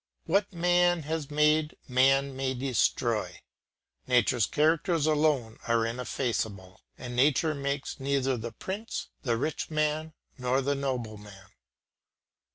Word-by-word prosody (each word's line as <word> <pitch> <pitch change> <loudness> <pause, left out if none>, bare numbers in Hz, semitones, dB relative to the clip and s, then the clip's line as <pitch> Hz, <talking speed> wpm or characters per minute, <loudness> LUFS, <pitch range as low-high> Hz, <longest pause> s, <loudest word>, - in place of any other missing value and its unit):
What 200 +4 +1
man 175 -1 +2
has 155 -1 -3
made, 150 +1 +2
man 135 +1 +3
may 130 0 -1
destroy. 125 -2 0 0.7
Nature's 125 -2 +3
characters 160 +1 +2
alone 150 -7 +1
are 115 -1 +2
ineffaceable, 115 -5 -3 0.2
and 125 -1 -7
nature 150 +4 +3
makes 140 -1 -3
neither 135 -1 0
the 115 0 -5
prince, 200 - -5
the 120 -5 0
rich 155 +6 -2
man, 155 0 -1 0.3
nor 125 +2 +1
the 140 +2 +1
nobleman. 110 -8 -5
140 Hz, 115 wpm, -28 LUFS, 125-155 Hz, 0.7 s, man